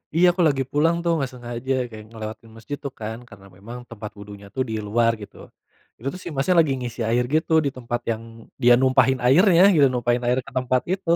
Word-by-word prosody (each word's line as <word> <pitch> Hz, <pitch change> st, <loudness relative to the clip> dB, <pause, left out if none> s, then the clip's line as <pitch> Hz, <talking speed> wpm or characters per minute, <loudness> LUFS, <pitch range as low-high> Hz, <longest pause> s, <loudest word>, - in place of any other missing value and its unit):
Iya, 175 Hz, +2 st, +5 dB
aku 180 Hz, +1 st, -2 dB
lagi 135 Hz, -3 st, +1 dB
pulang 160 Hz, +3 st, +2 dB
tuh, 170 Hz, -, +1 dB
gak 135 Hz, -, -3 dB
sengaja 120 Hz, +1 st, -4 dB, 0.2 s
kayak 110 Hz, -1 st, -11 dB
ngelewatin 110 Hz, +1 st, -8 dB
mesjid 145 Hz, +6 st, -6 dB
tuh 140 Hz, -, -4 dB
kan, 110 Hz, +1 st, -5 dB
karena 100 Hz, -2 st, -15 dB
memang 115 Hz, +5 st, -9 dB
tempat 105 Hz, -2 st, -8 dB
wudunya 100 Hz, 0 st, -11 dB
tuh 130 Hz, -, -1 dB
di -, -, -3 dB
luar, 115 Hz, +2 st, +3 dB
gitu. 105 Hz, -, -11 dB, 0.6 s
Itu 120 Hz, -, -7 dB
tuh 185 Hz, -, -9 dB
si -, -, -6 dB
masnya 150 Hz, +7 st, +1 dB
lagi 155 Hz, -4 st, 0 dB
ngisi 120 Hz, -1 st, -6 dB
air 120 Hz, +2 st, +2 dB
gitu, 160 Hz, +1 st, +1 dB
di -, -, +2 dB
tempat 120 Hz, -1 st, -4 dB
yang 110 Hz, 0 st, -4 dB, 0.4 s
dia 120 Hz, -1 st, +6 dB
numpahin 130 Hz, 0 st, +3 dB
airnya 175 Hz, -, +6 dB
gitu, 145 Hz, -4 st, +5 dB
numpahin 120 Hz, 0 st, 0 dB
air 125 Hz, -, +2 dB
ke -, -, -12 dB
tempat 125 Hz, 0 st, +1 dB
itu. 190 Hz, -3 st, -5 dB
125 Hz, 215 wpm, -23 LUFS, 115-140 Hz, 0.6 s, dia